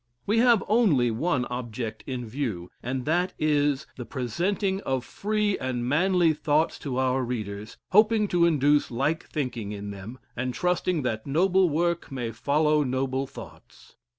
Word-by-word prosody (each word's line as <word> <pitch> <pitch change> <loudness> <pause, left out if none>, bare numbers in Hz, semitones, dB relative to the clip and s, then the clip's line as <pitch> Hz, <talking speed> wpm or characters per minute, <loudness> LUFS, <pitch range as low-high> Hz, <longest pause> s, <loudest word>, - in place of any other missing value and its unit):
We 215 +3 +2
have 235 -4 +5
only 175 - +3
one 130 +2 0
object 115 -3 -5
in 125 -2 -4
view, 110 -8 -4
and 130 +1 -3
that 175 +4 +1
is, 145 -2 +1
the 125 - -5
presenting 185 - -1
of 130 -6 -2
free 210 -1 -1
and 125 -2 -2
manly 175 +3 +3
thoughts 155 +1 +1
to 130 -3 -4
our 130 0 +1
readers, 110 -3 -5
hoping 215 +1 +5
to 170 -1 +4
induce 145 -2 +3
like 140 +7 -1
thinking 125 -8 -3
in 100 0 -6
them, 100 +5 -8 0.2
and 125 +1 -3
trust 180 0 0
ing 175 -6 +1
that 110 -2 -2
noble 180 +5 +3
work 170 +2 0
may 120 -4 -3
follow 150 +6 +2
noble 130 +1 -1
thoughts. - - -13
140 Hz, 155 wpm, -26 LUFS, 125-175 Hz, 0.2 s, have